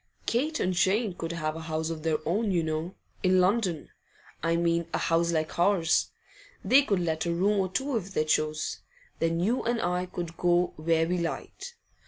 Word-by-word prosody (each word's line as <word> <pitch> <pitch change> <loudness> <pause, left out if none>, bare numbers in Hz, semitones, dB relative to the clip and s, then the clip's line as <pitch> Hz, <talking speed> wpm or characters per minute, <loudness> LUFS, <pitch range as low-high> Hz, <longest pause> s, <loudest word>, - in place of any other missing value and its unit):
Kate 295 +6 0
and 185 - +1
Jane 195 +4 +2
could 165 -1 -5
have 155 -2 -2
a - - -5
house 160 0 -2
of 160 -1 -5
their 160 -1 +1
own, 205 +6 +1
you 175 -3 +1
know 160 +3 -3 0.3
in 185 0 +4
London, 185 -4 +1 0.5
I 165 +1 +1
mean, 170 0 +1
a - - +2
house 170 +1 +1
like 160 0 -2
ours; 175 -2 +3 0.6
they 270 +2 +6
could 205 -9 0
let 160 -1 -1
a - - +1
room 195 +4 +2
or 190 -1 0
two 265 +7 -2
if 195 -2 -5
they 155 - +2
chose. 155 0 0 0.4
Then 165 0 +1
you 225 +9 +1
and 235 0 0
I 180 0 -1
could 170 -2 -6
go 175 0 +2
where 165 +1 +1
we 180 +1 0
liked. 170 - -5
175 Hz, 195 wpm, -28 LUFS, 165-195 Hz, 0.6 s, they